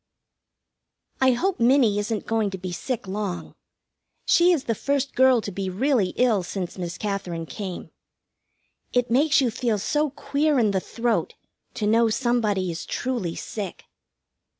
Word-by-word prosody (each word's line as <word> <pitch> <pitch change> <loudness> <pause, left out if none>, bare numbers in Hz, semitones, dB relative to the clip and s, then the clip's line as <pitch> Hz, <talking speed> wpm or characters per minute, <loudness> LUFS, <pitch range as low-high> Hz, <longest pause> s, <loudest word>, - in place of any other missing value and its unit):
I 260 -1 +5
hope 360 +6 -1
Minnie 235 -4 +4
isn't 210 0 -2
going 225 -2 0
to 190 - -6
be 185 0 -6
sick 220 +4 -4
long. 195 -2 -4 0.7
She 350 +1 +5
is 320 -7 +1
the 230 - 0
first 280 +4 -1
girl 260 -2 +5
to 205 - -5
be 190 0 -3
really 215 0 +1
ill 235 -6 +3
since 180 0 -5
Miss 175 -2 -5
Katherine 190 -5 -3
came. 190 +1 -6 1.0
It 245 -1 +1
makes 285 +4 +4
you 250 -3 +1
feel 230 -1 0
so 295 +9 0
queer 290 +1 0
in 220 -4 +3
the 190 - +1
throat 235 +5 -1 0.4
to 210 - -2
know 225 +2 +4
somebody 215 -6 0
is 165 - -6
truly 240 -10 -2
sick. 200 -5 -6
225 Hz, 150 wpm, -24 LUFS, 195-260 Hz, 1.0 s, I